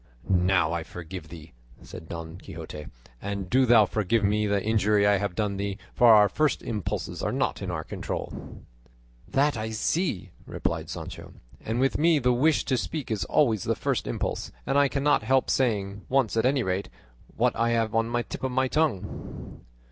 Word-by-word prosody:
"Now 90 -3 +3
I 85 - -1
forgive 85 +1 -8
thee," 80 -2 -12 0.3
said 80 - -10
Don 85 +1 -7
Quixote; 80 -6 -8 0.3
"and 100 -2 -4
do 130 0 +4
thou 115 -3 +7
forgive 105 +2 0
me 105 +1 +2
the 100 0 +2
injury 105 -2 +3
I 100 0 +4
have 100 -2 -3
done 100 -1 -1
thee; 100 0 -3 0.2
for 120 -1 +6
our 105 -1 +7
first 155 +9 0
impulses 105 -6 -3
are - - -1
not - - -1
in - - -4
our - - -3
control." - - -6 0.6
"That 140 +1 +2
I 110 0 -3
see," 110 - -1 0.2
replied - - -3
Sancho, - - -8 0.3
"and 115 +2 -2
with 135 +2 +1
me 165 0 +4
the 125 -3 +2
wish 150 +6 +2
to 130 - +1
speak 145 -1 -4
is 110 - -1
always 115 -10 +2
the - - +1
first - - -1
impulse, - - -3
and - - -1
I 140 0 +5
cannot 140 +2 +2
help 130 0 +2
saying, 100 -6 0
once 130 -5 +2
at 115 +2 +3
any 135 -1 +2
rate, 95 -1 -2 0.5
what - - +2
I 115 0 +1
have 115 -2 +1
on 115 +1 +1
the 120 0 0
tip - - -8
of 130 - -1
my 130 +1 +1
tongue." 150 -9 -3
110 Hz, 185 wpm, -26 LUFS, 95-130 Hz, 0.6 s, thou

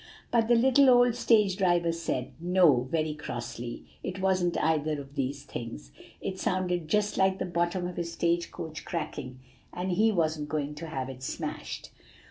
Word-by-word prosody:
"But 230 -2 +3
the 240 - +5
little 265 +3 +5
old 245 -1 +6
stage 215 -5 +3
driver 175 -3 +3
said, 165 -6 -3
'No,' 170 -8 +4
very 155 -1 0
crossly; 120 -5 -6 0.2
'it 185 +1 -5
wasn't 185 -2 +1
either 155 -1 +1
of 140 0 -10
these 140 +1 -2
things.' - - -7 0.3
It 190 -1 -4
sounded 180 -3 0
just 210 +5 +1
like 190 0 +3
the - - -2
bottom 175 +1 0
of 180 0 -5
his 170 -1 -3
stage 170 0 0
coach 160 -1 -7
cracking, 145 -6 -5 0.3
and 180 +1 -3
he 220 +5 +4
wasn't 155 -5 0
going 150 -1 -2
to 160 +2 -7
have 135 -5 -3
it 130 -1 -8
smashed. 130 - -5
170 Hz, 170 wpm, -29 LUFS, 150-190 Hz, 0.3 s, old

